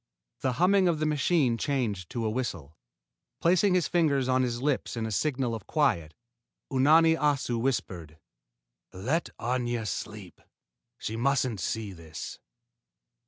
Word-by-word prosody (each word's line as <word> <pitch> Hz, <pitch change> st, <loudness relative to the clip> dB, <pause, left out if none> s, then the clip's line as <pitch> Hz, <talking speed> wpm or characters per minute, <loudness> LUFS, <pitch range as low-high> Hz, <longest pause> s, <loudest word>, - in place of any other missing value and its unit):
The 130 Hz, -1 st, 0 dB
humming 185 Hz, +6 st, +4 dB
of 170 Hz, -2 st, +2 dB
the 155 Hz, -, -1 dB
machine 145 Hz, -5 st, +2 dB
changed 115 Hz, -, -1 dB
to 115 Hz, -2 st, -3 dB
a -, -, +1 dB
whistle. 85 Hz, -, -4 dB, 0.6 s
Placing 185 Hz, +3 st, +3 dB
his 180 Hz, -, +2 dB
fingers 145 Hz, -7 st, +2 dB
on 130 Hz, 0 st, +3 dB
his 120 Hz, -2 st, -1 dB
lips 135 Hz, -2 st, -1 dB
in 115 Hz, -, -1 dB
a 110 Hz, -, -4 dB
signal 130 Hz, +1 st, 0 dB
of 110 Hz, -3 st, -6 dB
quiet, 85 Hz, -, +1 dB, 0.6 s
Unani 160 Hz, +5 st, +5 dB
Assu 140 Hz, -6 st, 0 dB
whispered: 90 Hz, -, -2 dB, 0.7 s
"Let 130 Hz, -, -1 dB
Aña 120 Hz, -2 st, -1 dB
sleep. -, -, -6 dB, 0.6 s
She 110 Hz, -, -4 dB
mustn't 130 Hz, -2 st, +1 dB
see 105 Hz, +1 st, -3 dB
this." 80 Hz, -3 st, -8 dB
130 Hz, 135 wpm, -28 LUFS, 110-150 Hz, 0.7 s, Unani